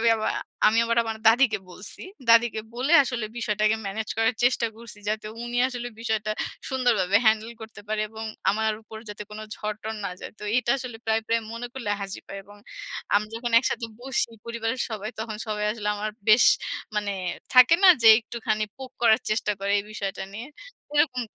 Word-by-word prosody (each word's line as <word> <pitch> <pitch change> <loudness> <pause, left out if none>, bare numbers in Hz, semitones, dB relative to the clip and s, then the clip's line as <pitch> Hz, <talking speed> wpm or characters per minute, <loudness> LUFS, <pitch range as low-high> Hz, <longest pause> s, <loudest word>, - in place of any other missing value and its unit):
আমি 230 - +3
আবা 215 - -1 0.4
আমি 215 +1 +4
আবার 230 0 0
আমার 225 -1 -4
দাদিকে 225 -1 +4
বলছি। 185 +2 -8 0.3
দাদিকে 230 -1 +5
বলে 260 +6 -1
আসলে 240 -3 -3
বিষয়টাকে 215 -1 +1
ম্যানেজ 215 +3 -4
করার 225 +2 +3
চেষ্টা 245 -1 +3
করছি 230 -2 -11
যাতে 215 0 -2 0.2
উনি 240 0 -4
আসলে 245 -2 -5
বিষয়টা 220 -2 -1 0.4
সুন্দরভাবে 230 -8 +2
হ্যান্ডেল 220 +1 +3
করতে 220 0 -10
পারে 215 0 -1
এবং 220 0 -7 0.3
আমার 220 +2 +1
উপর 220 0 -11
যাতে 210 0 -6
কোন 210 - -8 0.2
ঝড়-টর 215 +1 -4
না 195 - -2
যায়। - - -8
তো - - -13 0.2
এটা 240 -1 -1
আসলে 250 -3 -7
প্রায়, 225 0 +1
প্রায় 230 0 +2
মনে 230 +1 -5
করলে 265 - -7 0.2
হাসি 195 0 -6
পায় 195 - -6
এবং 205 +1 -15 0.6
আমি 210 +1 +3
যখন 240 +1 -3
একসাথে 235 -1 -2
বসি 260 -2 -1 0.2
পরিবারের 235 +1 -3
সবাই 215 0 -4
তখন 220 -1 -4
সবাই 210 -1 -2
আসলে 210 -2 -4
আমার 215 +1 -3 0.2
বেশ 215 +3 +7 0.5
মানে 205 -1 0 0.4
থাকে 255 +5 +8
না - - +10
যে 225 - +8
একটুখানি 220 -2 -2
পোক 265 -1 -9
করার 220 -2 +5
চেষ্টা 215 -1 +1
করে 200 - -1
এই 200 - -3
বিষয়টা 195 -2 -4
নিয়ে? 225 +5 -7 0.5
এরকম 265 -4 +3
220 Hz, 185 wpm, -25 LUFS, 215-235 Hz, 0.6 s, না